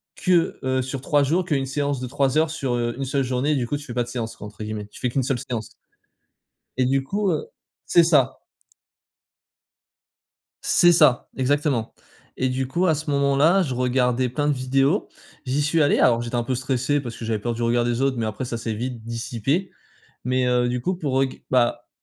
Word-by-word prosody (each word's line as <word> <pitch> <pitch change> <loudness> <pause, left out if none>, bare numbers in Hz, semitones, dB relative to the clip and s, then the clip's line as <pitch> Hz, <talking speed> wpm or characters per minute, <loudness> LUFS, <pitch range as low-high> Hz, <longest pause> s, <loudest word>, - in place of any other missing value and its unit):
que, 180 -3 +1
heu 130 0 +1
sur 130 +2 -4
3 145 0 +2
jours, 170 +6 +1
qu'1 140 -5 0
séance 140 -1 -2
de 125 - -3
3 140 +1 0
heures 160 0 +3
sur, 135 -6 -2
heu, 120 0 -1
1 135 - -3
seule 135 +1 0
journée», 130 +4 0
du 125 -4 -1
coup, 145 - -1
«tu 145 - -10
fais 120 - -7
pas 120 - +1
de 120 - -10
séance», 115 -2 -4
quoi, 105 - -9
entre 105 +1 -13
guillemets. 105 -1 -5
Tu - - -14
fais 125 - 0
qu'1 130 +1 0
seule 130 -1 -1
séance. 115 -3 -5 1.1
Et 130 - +2
du 135 +1 +1
coup, 200 +6 0
heu 455 - -2 0.4
c'est 170 - +5
ça. 150 -6 +3 2.2
C'est 175 - +5
ça, 150 -7 +4
exactement. 135 -3 0 0.4
Et 130 - +1
du 130 0 -2
coup, 175 +7 0
à 160 - +3
ce 155 +1 -5
moment 140 -1 +2
là, 170 +7 +5
je 130 -6 -3
regardais 125 0 +1
plein 145 +4 -1
de 150 - +3 0.9
j'y 135 +3 0
suis 155 +2 +2
allé. 145 - +3
Alors, 120 -2 +4
j'étais 120 +1 -4
un 120 - +1
peu 130 +2 -1
stressé 130 +3 0
parce 120 -5 -6
que 115 - -6
j'avais 110 -1 -1
peur 120 +3 -2
du 115 - -6
regard 120 +1 +2
des 120 +1 0
autres 135 -2 +1
mais 115 - -1
après, 110 +4 -4
ça 115 -1 -4
s'est 115 -1 -3
vite 120 +1 -5
dissipé. 120 - -2 0.5
Mais, 125 0 +1
heu, 125 0 +2
du 125 0 -1
coup, 180 +8 -1
pour, 135 -5 0
heu, 135 - +1
g - - -15
bah, 120 -1 +1
130 Hz, 220 wpm, -23 LUFS, 120-145 Hz, 2.2 s, c'est